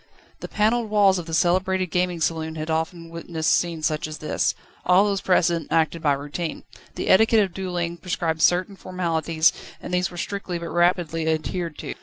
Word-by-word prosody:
The -, -, -6 dB
panelled 220 Hz, +2 st, +1 dB
walls 200 Hz, -3 st, +4 dB
of 170 Hz, -, -8 dB
the 165 Hz, -, -6 dB
celebrated 185 Hz, +1 st, +1 dB
gaming 180 Hz, -1 st, 0 dB
saloon 160 Hz, 0 st, -1 dB
had 155 Hz, +1 st, -4 dB
often 165 Hz, +1 st, -3 dB
witnessed 165 Hz, -1 st, -2 dB
scenes 165 Hz, -3 st, 0 dB
such 155 Hz, 0 st, -1 dB
as 155 Hz, 0 st, -7 dB
this. 155 Hz, -, -1 dB, 0.3 s
All 180 Hz, +3 st, +5 dB
those 200 Hz, -2 st, 0 dB
present 170 Hz, -4 st, +2 dB
acted 165 Hz, 0 st, +1 dB
by 145 Hz, -3 st, +3 dB
routine. 145 Hz, +4 st, -5 dB, 0.3 s
The -, -, -4 dB
etiquette 220 Hz, +3 st, +5 dB
of 190 Hz, -3 st, -4 dB
duelling 175 Hz, -2 st, -3 dB
prescribed 165 Hz, -2 st, -2 dB
certain 185 Hz, +4 st, +2 dB
formalities, 165 Hz, -4 st, 0 dB, 0.3 s
and -, -, -7 dB
these 180 Hz, +1 st, +1 dB
were 175 Hz, -, -11 dB
strictly 195 Hz, -2 st, -4 dB
but 170 Hz, 0 st, -6 dB
rapidly 175 Hz, -2 st, +1 dB
adhered 160 Hz, +1 st, -2 dB
to. -, -, -5 dB
170 Hz, 180 wpm, -23 LUFS, 160-185 Hz, 0.3 s, All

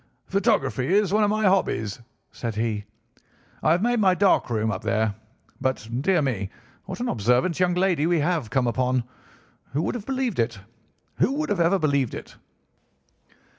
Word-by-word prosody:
"'Photography 150 Hz, -, +1 dB
is 205 Hz, -2 st, +2 dB
one 215 Hz, 0 st, +4 dB
of 205 Hz, -, +3 dB
my 215 Hz, +1 st, 0 dB
hobbies,' 155 Hz, -, +1 dB, 0.3 s
said 115 Hz, -3 st, -5 dB
he. 110 Hz, -2 st, -2 dB, 0.8 s
'I 155 Hz, -, +3 dB
have 175 Hz, -, +1 dB
made 240 Hz, 0 st, +2 dB
my 190 Hz, -3 st, +4 dB
dark 195 Hz, -7 st, +3 dB
room 110 Hz, -1 st, 0 dB
up 95 Hz, -, -4 dB
there. 110 Hz, -1 st, 0 dB, 0.5 s
But, 130 Hz, -5 st, -1 dB
dear 175 Hz, 0 st, +2 dB
me! 105 Hz, -8 st, -2 dB, 0.4 s
what 185 Hz, -1 st, -6 dB
an 245 Hz, -, -2 dB
observant 125 Hz, -, +1 dB
young 180 Hz, -1 st, +2 dB
lady 180 Hz, -4 st, +2 dB
we 175 Hz, 0 st, +2 dB
have 155 Hz, -6 st, 0 dB
come 125 Hz, +2 st, +1 dB
upon. 125 Hz, +1 st, +1 dB, 0.7 s
Who 150 Hz, +4 st, 0 dB
would -, -, -1 dB
have 235 Hz, -4 st, -6 dB
believed 260 Hz, -, -1 dB
it? 115 Hz, -1 st, 0 dB, 0.6 s
Who 270 Hz, -, +2 dB
would 310 Hz, +2 st, -2 dB
have 205 Hz, -3 st, 0 dB
ever 170 Hz, +3 st, +4 dB
believed 140 Hz, -7 st, 0 dB
it? -, -, -9 dB
155 Hz, 170 wpm, -24 LUFS, 120-195 Hz, 0.8 s, one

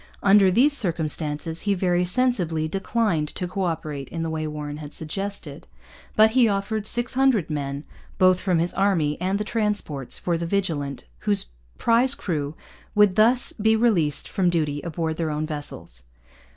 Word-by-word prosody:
Under 195 Hz, -1 st, +6 dB
these 255 Hz, +10 st, +4 dB
circumstances 160 Hz, -, -1 dB
he 205 Hz, -1 st, 0 dB
very 180 Hz, -1 st, +1 dB
sensibly 180 Hz, -6 st, 0 dB
declined 195 Hz, -3 st, 0 dB
to 180 Hz, -, -3 dB
co 190 Hz, +1 st, -2 dB
operate 155 Hz, -5 st, -4 dB
in 165 Hz, -1 st, -4 dB
the 165 Hz, -, -3 dB
way 155 Hz, -1 st, -3 dB
Warren 150 Hz, -1 st, -5 dB
had 150 Hz, -1 st, -8 dB
suggested. 165 Hz, -2 st, -5 dB, 0.5 s
But 220 Hz, +1 st, +6 dB
he 245 Hz, -1 st, +4 dB
offered 205 Hz, +1 st, -1 dB
600 245 Hz, -, +1 dB
men, 140 Hz, -1 st, -4 dB, 0.3 s
both 185 Hz, -1 st, +4 dB
from 185 Hz, -3 st, +1 dB
his 170 Hz, +2 st, 0 dB
army 175 Hz, -7 st, +1 dB
and 190 Hz, +2 st, 0 dB
the 210 Hz, -, -2 dB
transports, 210 Hz, -, -2 dB
for 170 Hz, -2 st, -1 dB
the 170 Hz, -, -3 dB
Vigilant, 160 Hz, -8 st, -2 dB
whose 100 Hz, -11 st, +1 dB, 0.3 s
prize 245 Hz, +4 st, +3 dB
crew 150 Hz, -4 st, -3 dB, 0.4 s
would 210 Hz, -2 st, +5 dB
thus 240 Hz, +4 st, +4 dB
be 220 Hz, +1 st, +2 dB
released 200 Hz, -11 st, +1 dB
for 195 Hz, -, -3 dB
duty 150 Hz, -4 st, -1 dB
aboard 160 Hz, -1 st, -3 dB
their 165 Hz, -2 st, -1 dB
own 150 Hz, +1 st, -2 dB
vessels. 145 Hz, -, -5 dB
175 Hz, 160 wpm, -24 LUFS, 155-210 Hz, 0.5 s, Under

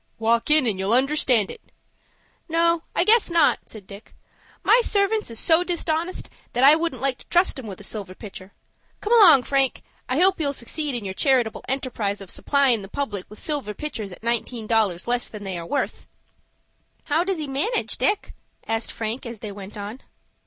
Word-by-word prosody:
"Walk 230 Hz, +3 st, +1 dB
in, 300 Hz, -3 st, +5 dB
and 205 Hz, -5 st, -1 dB
you'll 195 Hz, +4 st, +2 dB
understand 260 Hz, -5 st, +2 dB
it." -, -, -11 dB, 0.9 s
"No, 335 Hz, 0 st, +2 dB
I -, -, +3 dB
guess 445 Hz, -1 st, +4 dB
not," 335 Hz, -3 st, +3 dB
said 215 Hz, -4 st, -10 dB
Dick. 200 Hz, +3 st, -13 dB, 0.5 s
"My 485 Hz, -, +5 dB
servants 420 Hz, -, +1 dB
is 230 Hz, -, -5 dB
so 325 Hz, +8 st, +3 dB
dishonest 345 Hz, 0 st, -2 dB, 0.3 s
that 245 Hz, -, +1 dB
I 280 Hz, +2 st, +9 dB
wouldn't 330 Hz, -3 st, -3 dB
like 270 Hz, -2 st, 0 dB
to -, -, -17 dB
trust 350 Hz, -5 st, +2 dB
'em 240 Hz, -, -8 dB
with 195 Hz, -3 st, -8 dB
a -, -, -11 dB
silver 195 Hz, -2 st, -6 dB
pitcher. 195 Hz, -2 st, -10 dB, 0.5 s
Come 430 Hz, -, -1 dB
along, 345 Hz, -, +8 dB
Frank. 270 Hz, -1 st, 0 dB, 0.3 s
I 255 Hz, +4 st, +1 dB
hope 380 Hz, +1 st, +4 dB
you'll 285 Hz, -3 st, 0 dB
succeed 285 Hz, +3 st, -3 dB
in 230 Hz, -4 st, -5 dB
your 190 Hz, -, -4 dB
charitable 250 Hz, -1 st, +1 dB
enterprise 235 Hz, -6 st, -2 dB
of 195 Hz, -2 st, -6 dB
supplyin' 275 Hz, -6 st, +2 dB
the 195 Hz, -, -9 dB
public 205 Hz, -5 st, -4 dB
with 210 Hz, -, -12 dB
silver 280 Hz, -8 st, -3 dB
pitchers 225 Hz, -10 st, -5 dB
at 180 Hz, -, -12 dB
nineteen 235 Hz, 0 st, -2 dB
dollars 215 Hz, -5 st, +1 dB
less 245 Hz, 0 st, +1 dB
than 210 Hz, -2 st, -9 dB
they 190 Hz, -2 st, -4 dB
are 170 Hz, -, -8 dB
worth." 285 Hz, -, -3 dB, 1.0 s
"How 335 Hz, -, +1 dB
does 380 Hz, 0 st, -1 dB
he 310 Hz, -, -4 dB
manage, 295 Hz, -, -1 dB
Dick?" 410 Hz, 0 st, 0 dB, 0.3 s
asked 225 Hz, 0 st, -2 dB
Frank, 230 Hz, +3 st, -4 dB
as 235 Hz, -1 st, -7 dB
they 210 Hz, 0 st, -7 dB
went 200 Hz, +1 st, -10 dB
on. 210 Hz, +5 st, -7 dB
250 Hz, 190 wpm, -23 LUFS, 215-315 Hz, 1.0 s, I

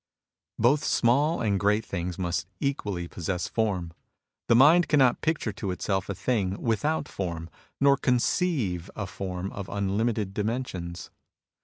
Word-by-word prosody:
Both 130 Hz, +6 st, +3 dB
small 140 Hz, +7 st, +2 dB
and 100 Hz, -4 st, +1 dB
great 105 Hz, +2 st, +2 dB
things 90 Hz, -1 st, -4 dB
must 90 Hz, -1 st, -2 dB
equally 105 Hz, -11 st, -2 dB
possess 90 Hz, +1 st, -3 dB
form. 95 Hz, -7 st, -1 dB, 0.5 s
The 115 Hz, -, +5 dB
mind 155 Hz, +7 st, +6 dB
cannot 135 Hz, -5 st, +4 dB
picture 155 Hz, -8 st, 0 dB
to 100 Hz, -1 st, -4 dB
itself 95 Hz, +1 st, -2 dB
a 100 Hz, -, -2 dB
thing 95 Hz, 0 st, -1 dB
without 145 Hz, +7 st, 0 dB
form, 85 Hz, -3 st, -5 dB, 0.3 s
nor 140 Hz, 0 st, +5 dB
conceive 125 Hz, -, 0 dB
a 105 Hz, -, -3 dB
form 95 Hz, 0 st, -5 dB
of 100 Hz, -1 st, -7 dB
unlimited 105 Hz, +1 st, -1 dB
dimensions. 105 Hz, -6 st, -4 dB
105 Hz, 135 wpm, -27 LUFS, 90-125 Hz, 0.5 s, mind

